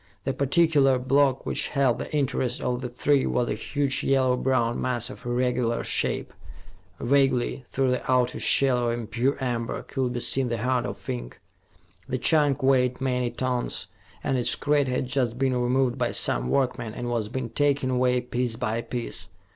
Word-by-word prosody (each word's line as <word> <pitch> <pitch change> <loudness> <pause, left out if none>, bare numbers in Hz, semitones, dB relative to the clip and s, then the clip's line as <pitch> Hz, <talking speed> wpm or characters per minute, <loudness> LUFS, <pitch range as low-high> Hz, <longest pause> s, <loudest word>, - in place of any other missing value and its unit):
The - - -1
particular 140 -2 +3
block 135 +1 +2
which - - -1
held 135 -4 +1
the - - -6
interest 135 -4 0
of 125 0 -2
the 125 - -4
three 135 +3 +1
was 120 -1 0
a - - 0
huge 135 +5 -1
yellow 130 -2 +3
brown 125 -2 0
mass 125 -2 -1
of 125 - -10
irregular 120 -1 0
shape. - - -1 0.7
Vaguely, 130 -1 +1
through 130 -1 +1
the 125 0 -1
outer 125 -1 +2
shell 125 -3 +3
of - - 0
impure 120 +4 -1
amber, 120 -3 -3
could 130 -2 -2
be 120 - -2
seen 130 +1 0
the 115 - -1
heart 125 +2 0
of - - -8
ink. - - -5 0.7
The 130 - -1
chunk 145 0 +2
weighed 130 -2 +3
many 125 -2 0
tons, 125 -3 -2 0.4
and 135 -2 0
its 120 - +1
crate 145 -1 +1
had 125 0 -1
just 125 -2 -1
been 130 -1 +1
removed 125 0 +1
by - - 0
some - - +2
workmen 125 -4 -1
and 120 - -4
was 115 -3 -2
being 130 -1 -4
taken 140 -2 +1
away, 125 0 +2
piece 125 -1 -2
by 115 -1 -2
piece. 115 -7 -4
125 Hz, 175 wpm, -25 LUFS, 120-135 Hz, 0.7 s, particular